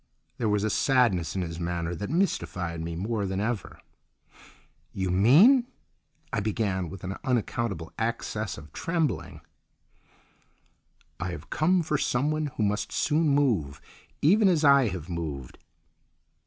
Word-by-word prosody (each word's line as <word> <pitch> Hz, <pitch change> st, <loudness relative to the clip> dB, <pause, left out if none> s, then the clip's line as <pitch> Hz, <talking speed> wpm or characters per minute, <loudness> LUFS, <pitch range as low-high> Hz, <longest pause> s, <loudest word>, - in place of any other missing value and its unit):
There 115 Hz, -3 st, +1 dB
was 105 Hz, -1 st, +1 dB
a 110 Hz, -, 0 dB
sadness 120 Hz, -, +2 dB
in 95 Hz, -, -1 dB
his 85 Hz, -1 st, -6 dB
manner 85 Hz, 0 st, -2 dB
that 100 Hz, +4 st, -5 dB
mystified 90 Hz, -, -1 dB
me 85 Hz, 0 st, -4 dB
more 100 Hz, +3 st, -2 dB
than 95 Hz, 0 st, -2 dB
ever. 110 Hz, -2 st, -3 dB, 1.1 s
"You 95 Hz, -2 st, -2 dB
mean—?" 170 Hz, -, +6 dB, 0.7 s
I 110 Hz, -, +1 dB
began, 100 Hz, -4 st, -1 dB
with 95 Hz, 0 st, -10 dB
an 95 Hz, +1 st, -4 dB
unaccountable 115 Hz, -, -2 dB
access 110 Hz, -2 st, -2 dB
of 75 Hz, +1 st, -12 dB
trembling. 165 Hz, -6 st, -2 dB, 1.8 s
"I 90 Hz, -, -3 dB
have 90 Hz, -, -8 dB
come 175 Hz, +3 st, +2 dB
for 150 Hz, -2 st, -1 dB
someone 150 Hz, +4 st, 0 dB
who 110 Hz, -, +1 dB
must 105 Hz, 0 st, -1 dB
soon 155 Hz, 0 st, +1 dB
move, 110 Hz, -, +1 dB, 0.4 s
even 200 Hz, +7 st, +5 dB
as 165 Hz, -4 st, +2 dB
I 140 Hz, -3 st, +6 dB
have 90 Hz, -6 st, -5 dB
moved." 75 Hz, -7 st, -5 dB
105 Hz, 135 wpm, -27 LUFS, 90-145 Hz, 1.8 s, mean